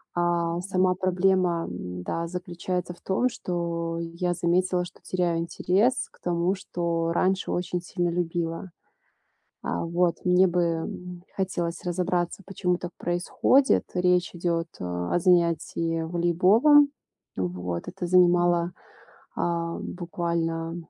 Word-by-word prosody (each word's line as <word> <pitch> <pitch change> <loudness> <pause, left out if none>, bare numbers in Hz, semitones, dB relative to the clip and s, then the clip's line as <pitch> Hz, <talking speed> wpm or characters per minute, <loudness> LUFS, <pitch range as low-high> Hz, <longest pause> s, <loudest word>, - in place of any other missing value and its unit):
А, 170 -1 +1
сама 185 -1 +1
проблема, 185 -2 +2
м, 90 0 -6
да, 165 - -2
заключается 180 0 -4
в - - -24
том, 220 +7 +1
что 170 -7 -3
я 170 +1 -2
заметила, 180 +1 +1
что - - -13
теряю 175 -2 0
интерес 190 +8 +1
к - - -24
тому, 175 +2 +1
что 170 -2 -2
раньше 185 +2 +1
очень 180 0 -2
сильно 175 0 -1
любила. 170 +1 -2 0.9
А - - -2
вот, 170 +1 +1
мне 180 +1 +5
бы, 180 0 +1
м, 175 +1 -3
хотелось 175 -3 -2
разобраться, 175 +1 -1
почему 180 -2 -1
так 175 - -6
происходит. 180 +10 +2
Речь 180 0 +2
идёт, 170 -1 -1
а, 90 -1 -3
о - - +4
занятии 170 -1 +2
волейболом. 185 - +5 0.5
Вот, 90 -1 -3
это 180 0 -4
занимало, 175 -1 +4 0.6
ам, 170 -1 -1
буквально, 170 -2 -2
175 Hz, 120 wpm, -26 LUFS, 170-180 Hz, 0.9 s, мне